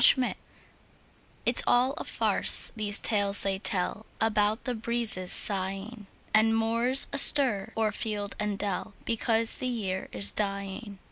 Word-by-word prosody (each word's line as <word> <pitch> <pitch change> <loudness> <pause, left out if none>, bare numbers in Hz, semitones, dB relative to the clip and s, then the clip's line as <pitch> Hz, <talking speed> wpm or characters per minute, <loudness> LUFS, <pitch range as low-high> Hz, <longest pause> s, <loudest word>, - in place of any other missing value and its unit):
MERRY 255 -2 +5
AUTUMN - - -10 1.1
It's - - +2
all 250 +2 +2
a 315 - -7
farce, - - +3
these 210 -1 0
tales 200 -2 0
they 195 -1 -2
tell 200 +2 -2
About 215 0 -1
the 250 - -3
breezes 225 -5 +1
sighing, 195 +2 +1 0.3
And 225 +1 +2
moans 230 +4 +1
astir 250 -7 +5
o'er 220 -1 0
field 205 -2 -5
and 210 -1 -3
dell, 200 0 -5
Because 230 0 0
the 255 - -5
year 200 -6 -5
is 100 -1 -2
dying. 200 0 -6
215 Hz, 140 wpm, -26 LUFS, 200-230 Hz, 1.1 s, MERRY